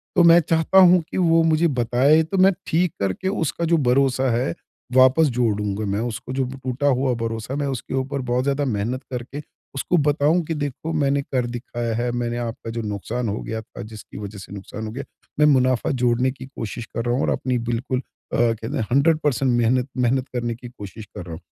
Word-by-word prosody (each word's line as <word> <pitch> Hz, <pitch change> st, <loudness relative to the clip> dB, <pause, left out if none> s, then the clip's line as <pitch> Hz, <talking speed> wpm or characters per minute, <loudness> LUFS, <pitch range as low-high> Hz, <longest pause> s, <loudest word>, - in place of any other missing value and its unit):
तो 175 Hz, -, +6 dB
मैं 170 Hz, 0 st, +8 dB
चाहता 165 Hz, +4 st, +1 dB
हूँ 180 Hz, -1 st, +7 dB
कि -, -, -3 dB
वो 165 Hz, -2 st, +4 dB
मुझे 160 Hz, +1 st, +3 dB
बताए 130 Hz, +3 st, +3 dB
तो 190 Hz, +5 st, -3 dB
मैं 190 Hz, +1 st, +6 dB, 0.2 s
ठीक 170 Hz, 0 st, +1 dB
करके 100 Hz, -, -2 dB
उसका 170 Hz, -3 st, -1 dB
जो 165 Hz, 0 st, +3 dB
भरोसा 130 Hz, 0 st, +3 dB
है 115 Hz, -7 st, 0 dB, 0.4 s
वापस 130 Hz, +5 st, +6 dB
जोड़ूँगा 105 Hz, -3 st, 0 dB
मैं 100 Hz, +1 st, -1 dB
उसको 120 Hz, +2 st, -6 dB
जो 135 Hz, 0 st, 0 dB, 0.2 s
टूटा 130 Hz, +3 st, -1 dB
हुआ 130 Hz, -1 st, +2 dB
भरोसा 115 Hz, +2 st, -4 dB
मैं 145 Hz, -1 st, -1 dB
उसके 130 Hz, -2 st, -4 dB
ऊपर 135 Hz, +1 st, -2 dB
बहुत 125 Hz, +1 st, +1 dB
ज़्यादा 140 Hz, +1 st, 0 dB
मेहनत 120 Hz, +2 st, -2 dB
करके 125 Hz, +4 st, -5 dB, 0.3 s
उसको 175 Hz, +6 st, +1 dB
बताऊँ 150 Hz, +3 st, +2 dB
कि 165 Hz, -, -2 dB
देखो 150 Hz, +1 st, -4 dB
मैंने 140 Hz, -2 st, +1 dB
कर 130 Hz, -3 st, -1 dB
दिखाया 120 Hz, -1 st, -4 dB
है। 120 Hz, +1 st, -1 dB
मैंने 120 Hz, 0 st, -2 dB
आपका 115 Hz, -1 st, -5 dB
जो 115 Hz, 0 st, -3 dB
नुकसान 110 Hz, +3 st, -3 dB
हो 105 Hz, -, -2 dB
गया 110 Hz, 0 st, -4 dB
था 110 Hz, -, -11 dB
जिसकी 110 Hz, -1 st, -10 dB
वजह 100 Hz, 0 st, -7 dB
से 95 Hz, -, -11 dB
नुकसान 100 Hz, +2 st, -7 dB
हो -, -, -6 dB
गया। 135 Hz, +4 st, -5 dB, 0.4 s
मैं 150 Hz, -, +6 dB
मुनाफा 130 Hz, -3 st, +3 dB
जोड़ने 125 Hz, 0 st, +1 dB
की 130 Hz, 0 st, -10 dB
कोशिश 115 Hz, -3 st, -6 dB
कर 115 Hz, +1 st, -5 dB
रहा 120 Hz, -, +1 dB
हूँ 130 Hz, -, 0 dB
और -, -, +1 dB
अपनी 130 Hz, -1 st, 0 dB
बिल्कुल 120 Hz, +2 st, -2 dB
अ, -, -, -8 dB
कहते 115 Hz, +3 st, 0 dB
हैं 110 Hz, -, -1 dB
100 145 Hz, +4 st, +4 dB
पर्सेंट 135 Hz, -2 st, +2 dB
मेहनत 120 Hz, +2 st, +2 dB
मेहनत 125 Hz, +1 st, +1 dB
करने 120 Hz, -2 st, -2 dB
की 120 Hz, +1 st, -10 dB
कोशिश 105 Hz, -2 st, -10 dB
कर 90 Hz, -, -9 dB
रहा 85 Hz, -, -7 dB
हूँ। 80 Hz, -, -8 dB
125 Hz, 210 wpm, -22 LUFS, 115-145 Hz, 0.4 s, मैं